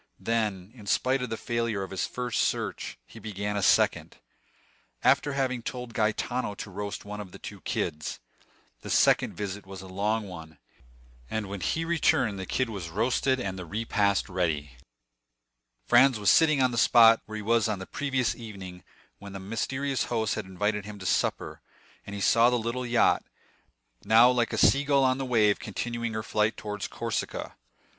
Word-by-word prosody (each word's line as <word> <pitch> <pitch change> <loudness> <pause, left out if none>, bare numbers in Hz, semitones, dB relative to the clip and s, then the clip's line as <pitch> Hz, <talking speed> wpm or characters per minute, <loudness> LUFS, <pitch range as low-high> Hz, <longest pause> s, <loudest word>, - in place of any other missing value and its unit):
Then, 105 -4 -1
in 110 -5 -13
spite 130 +5 +1
of 125 - -3
the 115 - -3
failure 115 -5 -2
of 95 - -8
his 95 - -2
first 125 -2 -2
search, - - -2
he 115 - -13
began 105 -1 -4
a 100 - 0
second, - - +2 0.9
after 145 - +3
having 130 -3 -1
told 125 0 -6
Gaetano 110 +1 -1
to 100 - -8
roast 100 +1 -5
one 105 +1 -6
of 95 -3 -10
the - - -10
two - - -9
kids. 75 -3 -3 0.6
The - - -8
second - - +3
visit 100 0 -5
was 95 -1 -9
a - - -10
long 105 +3 -1
one, 80 -3 -10 0.7
and 110 -2 -3
when 100 -1 -6
he 165 - -1
returned 130 - +1
the 95 - -5
kid 130 - 0
was 100 -7 -6
roasted 125 +7 +1
and 95 -5 -4
the 90 - -6
repast 100 0 0
ready. 80 -6 -1 1.1
Franz 125 0 +5
was 105 -1 +4
sitting 155 -4 +4
on 130 - +3
the 120 - 0
spot 115 -1 +6
where 110 - -7
he 105 - -5
was 115 +1 +2
on 105 -2 -1
the 95 - -7
previous 130 -1 -1
evening 95 -6 -9 0.4
when 100 0 -10
his 95 - -7
mysterious 130 +6 -2
host 110 -3 -1
had 110 - -4
invited 105 +2 -2
him 105 +1 -9
to 95 - -9
supper; - - -1 0.5
and 100 - -6
he 100 - -5
saw 115 +3 +5
the 125 - +1
little 120 +2 -3
yacht, 120 0 +3 0.8
now 115 +3 +6
like 120 -2 +1
a - - -2
sea 140 +1 +5
gull 140 -1 +3
on 130 0 +2
the 135 - -2
wave, 110 -5 +3
continuing 115 +2 -4
her 110 0 -3
flight 105 +1 0
towards 105 -2 -5
Corsica. - - -4
110 Hz, 180 wpm, -27 LUFS, 100-125 Hz, 1.1 s, spot